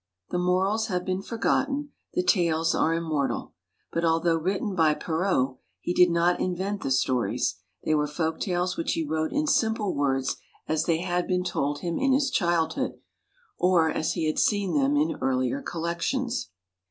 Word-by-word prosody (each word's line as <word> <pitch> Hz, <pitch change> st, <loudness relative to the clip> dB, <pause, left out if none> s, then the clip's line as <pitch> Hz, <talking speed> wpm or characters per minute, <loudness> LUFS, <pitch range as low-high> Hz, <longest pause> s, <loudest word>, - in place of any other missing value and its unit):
The 180 Hz, -, 0 dB
morals 190 Hz, +5 st, +1 dB
have 180 Hz, -3 st, -2 dB
been 185 Hz, 0 st, -1 dB
forgotten, 275 Hz, +6 st, -1 dB, 0.2 s
the 360 Hz, -, +2 dB
tales 165 Hz, -, +2 dB
are 165 Hz, +1 st, +2 dB
immortal. 155 Hz, -4 st, -2 dB, 0.4 s
But 165 Hz, -, -1 dB
although 165 Hz, 0 st, +3 dB
written 190 Hz, +4 st, -1 dB
by 160 Hz, -4 st, +3 dB
Perrault, 160 Hz, -7 st, 0 dB, 0.2 s
he 175 Hz, -, -2 dB
did 180 Hz, 0 st, +6 dB
not 170 Hz, +1 st, +2 dB
invent 190 Hz, +3 st, -2 dB
the -, -, -2 dB
stories, 125 Hz, -6 st, +1 dB, 0.3 s
they 155 Hz, -, +2 dB
were 150 Hz, -1 st, +2 dB
folk 160 Hz, +2 st, -2 dB
tales 180 Hz, -1 st, -1 dB
which 165 Hz, -, 0 dB
he 165 Hz, -, -1 dB
wrote 155 Hz, +1 st, -1 dB
in 295 Hz, +2 st, 0 dB
simple 220 Hz, -7 st, +1 dB
words 135 Hz, -2 st, 0 dB, 0.3 s
as 155 Hz, -1 st, 0 dB
they 165 Hz, -1 st, +1 dB
had 180 Hz, -1 st, -1 dB
been 180 Hz, 0 st, +1 dB
told 145 Hz, -4 st, -1 dB
him 170 Hz, -2 st, -2 dB
in 270 Hz, 0 st, +3 dB
his 275 Hz, 0 st, +2 dB
childhood, 170 Hz, -3 st, +1 dB, 0.7 s
or 175 Hz, -3 st, +4 dB
as 155 Hz, -, -1 dB
he 165 Hz, -, -1 dB
had 155 Hz, -, 0 dB
seen 205 Hz, -3 st, +1 dB
them 285 Hz, 0 st, +2 dB
in 310 Hz, +1 st, +1 dB
earlier 130 Hz, -, 0 dB
collections. 230 Hz, +8 st, -2 dB
175 Hz, 170 wpm, -26 LUFS, 160-200 Hz, 0.7 s, did